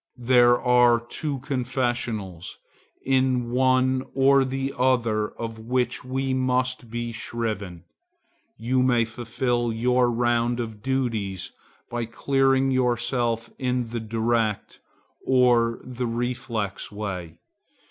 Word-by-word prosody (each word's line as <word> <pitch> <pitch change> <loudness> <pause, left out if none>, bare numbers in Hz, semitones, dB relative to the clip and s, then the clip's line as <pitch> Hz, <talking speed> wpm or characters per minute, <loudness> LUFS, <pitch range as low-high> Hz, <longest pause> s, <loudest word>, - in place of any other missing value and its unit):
There 120 0 +5
are 125 -1 +4
two 135 +3 -4
confessionals, 120 - -3 0.5
in 130 -2 +1
one 130 +1 +2
or 135 0 +5
the 135 +1 -3
other 115 -4 +1
of 115 -1 -6
which 125 +2 -1
we 130 +1 -2
must 130 -1 0
be 120 +1 -4
shriven. 105 -7 -4 0.7
You 125 +3 +1
may 120 -2 +3
fulfil 120 +1 -2
your 125 +2 +2
round 120 0 +1
of 110 -3 -5
duties 115 -8 -2 0.4
by 120 -1 -2
clearing 135 +2 +1
yourself 120 -2 0
in 125 -2 -1
the 120 - -2
direct, 115 -1 -1 0.4
or 120 -3 +3
in 130 - -10
the 125 0 -2
reflex 115 -4 -3
way. 95 -6 -5
120 Hz, 110 wpm, -25 LUFS, 115-130 Hz, 0.7 s, There